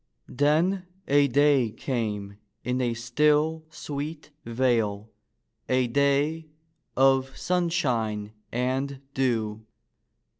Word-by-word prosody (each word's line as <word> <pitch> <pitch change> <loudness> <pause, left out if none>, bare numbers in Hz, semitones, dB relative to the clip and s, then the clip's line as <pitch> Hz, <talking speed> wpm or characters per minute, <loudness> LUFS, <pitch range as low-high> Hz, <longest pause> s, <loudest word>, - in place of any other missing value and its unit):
Then 165 +7 +1 0.2
a 145 0 +4
day 140 -2 +3
came 105 -5 -4 0.2
in 125 +1 -1
a 120 -2 0
still, 150 +6 +1
sweet 150 0 -6
vale, 115 -3 0 0.6
a 130 0 +3
day 140 +5 +1 0.5
of 135 0 +3
sun 180 -1 0
shine 115 -10 -1 0.2
and 130 +3 -1
dew. 110 -5 -1
135 Hz, 90 wpm, -26 LUFS, 115-150 Hz, 0.6 s, a